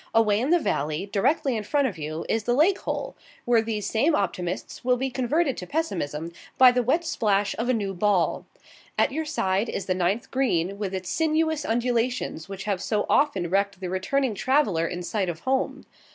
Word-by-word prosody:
Away 215 -2 +4
in 255 +5 -1
the 350 - +5
valley, 155 - -1
directly 270 +5 +2
in 220 - -1
front 280 +5 +1
of 210 - -5
you, 155 +2 -4
is 220 -2 -1
the 240 - +2
lake 345 +8 +4
hole, - - -4 0.3
where 240 -2 +4
these 220 -2 -3
same 290 +8 +2
optimists 180 -2 -3
will 250 0 +2
be 265 +1 -2
converted 270 +4 0
to 180 - -6
pessimism 170 - -2 0.3
by 255 -1 +8
the 250 0 +1
wet 310 +8 +1
splash 205 -9 +1
of 240 +2 -1
a - - +4
new 200 -3 -2
ball. 190 -1 +1 0.5
At - - +3
your 315 +3 -2
side 205 -8 0
is - - -3
the 185 - +1
ninth 185 +5 -1
green, 200 -7 0
with 195 -2 -3
its 185 -1 -4
sinuous 315 +2 +1
undulations 240 -6 -1
which 195 -1 -6
have 200 -3 -2
so 210 -1 0
often 280 -12 +2
wrecked 200 -1 +1
the 185 -2 -4
returning 245 +7 0
traveller 205 - +1
in 175 +1 -5
sight 190 0 -1
of 165 -1 -5
home. 265 0 -1
220 Hz, 195 wpm, -25 LUFS, 190-265 Hz, 0.5 s, by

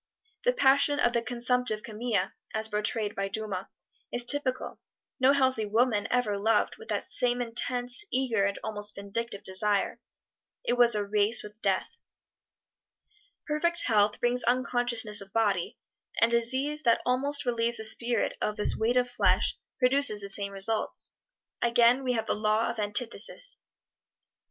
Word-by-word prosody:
The - - +3
passion 285 - +3
of 240 - +2
the 235 - +1
consumptive 245 -2 +1
Camille, 215 -3 -2 0.2
as 220 0 -2
portrayed 210 0 -2
by 195 0 -3
Dumas, 195 -2 -5 0.4
is 245 - -3
typical 255 0 -2 0.4
no 260 +1 +5
healthy 260 -6 +1
woman 220 0 +1
ever 215 -5 0
loved 220 +3 +1
with 450 0 -13
that - - -3
same 245 -1 +1
intense, 245 - +1
eager 250 -6 0
and 200 0 -1
almost 210 -1 -4
vindictive 200 +2 -4
desire. 200 +1 +1 0.6
It - - 0
was 240 -2 +5
a 205 -1 -1
race 210 +2 +2
with 210 +1 -12
Death. - - 0 1.6
Perfect 340 +3 +2
health 210 -2 +2
brings 245 +1 +2
unconsciousness 245 -4 +2
of 195 -1 -12
body, 205 -6 0 0.4
and 230 +1 +3
disease 260 +6 +1
that 235 -5 +2
almost 280 +3 0
relieves 235 -1 -1
the 220 - -6
spirit 235 +1 0
of 210 - -1
this 210 - +3
weight 235 +3 0
of 250 0 +2
flesh 245 - +1 0.2
produces 255 -4 +2
the 200 -1 -5
same 200 0 -1
results. 200 +3 0 0.5
Again 240 +2 +3
we 250 -1 0
have 225 -2 -2
the - - -1
Law 215 +1 0
of - - -9
Antithesis. 235 - 0
235 Hz, 150 wpm, -28 LUFS, 210-250 Hz, 1.6 s, no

